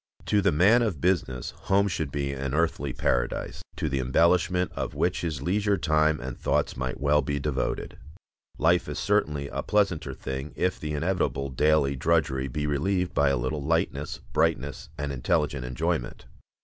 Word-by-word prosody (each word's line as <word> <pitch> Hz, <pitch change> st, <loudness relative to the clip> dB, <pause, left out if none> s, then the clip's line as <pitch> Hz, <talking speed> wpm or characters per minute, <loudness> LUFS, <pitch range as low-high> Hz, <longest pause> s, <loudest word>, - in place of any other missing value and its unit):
To 105 Hz, -, +2 dB
the -, -, +3 dB
man 100 Hz, +11 st, +5 dB
of 105 Hz, -11 st, -1 dB
business 75 Hz, -8 st, 0 dB
home 100 Hz, +1 st, +1 dB
should 80 Hz, -7 st, -2 dB
be 70 Hz, -1 st, -2 dB
an 70 Hz, 0 st, -3 dB
earthly 80 Hz, -4 st, 0 dB
paradise, -, -, -1 dB
to -, -, -2 dB
the 70 Hz, -2 st, -1 dB
embellishment 85 Hz, +7 st, +2 dB
of -, -, -4 dB
which -, -, 0 dB
his 75 Hz, -5 st, -3 dB
leisure 100 Hz, +4 st, +1 dB
time 75 Hz, -1 st, +2 dB
and 65 Hz, 0 st, -5 dB
thoughts -, -, 0 dB
might 65 Hz, 0 st, -3 dB
well 75 Hz, +1 st, +3 dB
be 70 Hz, +1 st, -2 dB
devoted. 70 Hz, -2 st, -2 dB, 0.6 s
Life 85 Hz, +3 st, +2 dB
is -, -, -4 dB
certainly 70 Hz, -1 st, 0 dB
a -, -, -3 dB
pleasanter 100 Hz, -6 st, 0 dB
thing 65 Hz, +2 st, -5 dB
if 90 Hz, +6 st, 0 dB
the 75 Hz, 0 st, -4 dB
inevitable 75 Hz, -5 st, -1 dB
daily 70 Hz, +1 st, +2 dB
drudgery 70 Hz, -2 st, +1 dB
be 75 Hz, +3 st, -3 dB
relieved 90 Hz, +6 st, 0 dB
by 70 Hz, 0 st, +3 dB
a 70 Hz, -, +1 dB
little 65 Hz, +5 st, -2 dB
lightness, 80 Hz, -2 st, -1 dB, 0.2 s
brightness, 75 Hz, -3 st, 0 dB
and 75 Hz, -2 st, -3 dB
intelligent 65 Hz, 0 st, 0 dB
enjoyment. 60 Hz, 0 st, -2 dB
75 Hz, 165 wpm, -27 LUFS, 70-85 Hz, 0.6 s, man